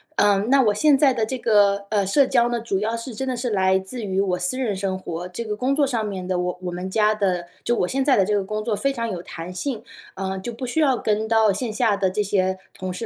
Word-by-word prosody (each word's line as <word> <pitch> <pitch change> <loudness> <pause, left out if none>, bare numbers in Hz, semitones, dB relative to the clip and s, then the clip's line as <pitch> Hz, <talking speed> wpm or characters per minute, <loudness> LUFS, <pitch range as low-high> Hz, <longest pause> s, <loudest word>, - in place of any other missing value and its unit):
嗯， 205 -1 +3
那 275 +1 +5
我 210 -5 +3
现 300 +1 +4
在 275 -1 +4
的 230 -3 0
这 260 +4 -4
个， 205 -3 +3
呃， 205 -2 +1
社 270 +9 +4
交 240 -2 +3
呢， 240 -1 -2
主 200 -4 -1
要 220 +3 -1
是 230 +2 -6
真 265 +5 -4
的 255 - -1
是 245 +1 -2
来 190 -3 +3
自 190 +6 -6
于 195 -2 0
我 180 -2 0
私 180 +8 -1
人 245 -6 -1
生 190 -1 -2
活， 175 -1 -6
这 180 +6 -6
个 215 -2 -3
工 260 +4 0
作 290 -1 +3
上 235 -5 -1
面 190 -3 -5
的， 185 -1 -1
我 180 0 -2
我 180 -1 -4
们 180 +2 -5
家 210 +2 +3
的 185 -5 -1 0.2
就 240 - +2
我 180 - +1
现 265 +7 -1
在 275 - +5
的 195 - +4
这 210 - 0
个 205 - +2
工 215 +1 -3
作 225 -1 -1
非 275 +6 0
常 230 -3 -3
有 175 - -4
弹 175 +1 -8
性， 230 +2 -4 0.3
呃， 190 0 -3
就 235 +5 -6
不 255 +3 -6
需 250 +6 -2
要 275 -5 +3
跟 215 0 0
到 220 -2 +4
线 215 +2 -3
下 215 -3 +2
的 190 -2 +1
这 210 +3 -1
些 190 -1 0 0.2
同 185 -1 -5
事 205 +6 -5
210 Hz, 305 characters per minute, -23 LUFS, 190-240 Hz, 0.3 s, 那